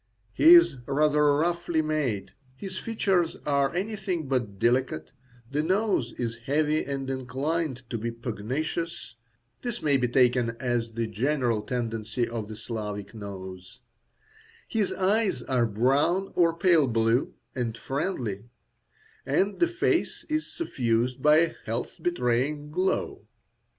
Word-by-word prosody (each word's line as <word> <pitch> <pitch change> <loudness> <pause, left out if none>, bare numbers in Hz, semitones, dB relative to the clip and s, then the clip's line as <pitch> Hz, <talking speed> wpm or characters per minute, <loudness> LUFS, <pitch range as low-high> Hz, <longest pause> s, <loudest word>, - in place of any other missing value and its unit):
He 335 +3 +8
is 340 - +6
rather 150 +1 +3
roughly 170 0 0
made, 145 -10 -1 0.2
his 185 +5 -6
features 195 -7 0
are 140 -2 +2
anything 190 -5 -2
but 120 -7 -1
delicate, 120 -8 +1 0.4
the 145 +2 +1
nose 185 - +1
is 115 -2 -3
heavy 150 +2 +2
and 135 -1 -4
inclined 130 +1 -2
to 115 - -2
be 115 +2 -2
pugnacious 125 - -4 0.5
(this 240 -1 -4
may 145 -2 +3
be 125 -1 +1
taken 120 -2 +2
as 120 -2 -1
the 115 0 -1
general 120 0 0
tendency 115 0 -2
of 115 -3 -4
the 110 - -7
Slavic 105 -2 -5
nose), 95 0 -9 0.9
his 215 -4 0
eyes 195 - +1
are 125 -3 +1
brown 140 - +2
or 165 -2 +3
pale 170 -6 +4
blue, 115 +1 +1 0.2
and 115 -3 -3
friendly, 130 - -3 0.8
and 200 +1 0
the 345 - +4
face 355 +1 0
is 310 0 -2
suffused 125 - -1
by 150 +2 +6
a 165 0 +2
health 115 +2 -4
betraying 145 -1 0
glow. 185 +4 -1
135 Hz, 130 wpm, -27 LUFS, 115-170 Hz, 0.9 s, He